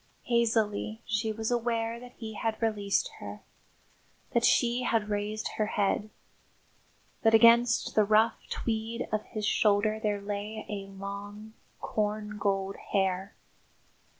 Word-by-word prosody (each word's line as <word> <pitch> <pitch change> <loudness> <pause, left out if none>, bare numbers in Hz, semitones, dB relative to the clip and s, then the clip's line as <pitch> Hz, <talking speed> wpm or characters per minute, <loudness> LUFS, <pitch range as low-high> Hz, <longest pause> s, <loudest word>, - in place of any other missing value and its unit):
III - - -17
Hazily 220 -1 +1
she 220 0 0
was 220 +2 -3
aware 230 -1 0
that 245 0 -12
he 220 -2 -7
had 220 +1 -2
released 215 - 0
her; - - -8 0.9
that 235 -2 +2
she 240 +1 +3
had 225 -4 0
raised 210 +1 -2
her 215 - +1
head; 205 +1 0 1.1
that 225 -1 +5
against 235 +1 +5
the 215 - +5
rough 215 +2 +3
tweed 230 +1 -2
of 215 0 +1
his 215 -1 -4
shoulder 215 +1 +2
there 210 -1 0
lay 205 +2 -5
a 200 -2 -5
long, 200 +2 -7 0.3
corn 210 0 -2
gold 195 -1 0 0.2
hair. 190 0 0
215 Hz, 130 wpm, -29 LUFS, 205-225 Hz, 1.1 s, that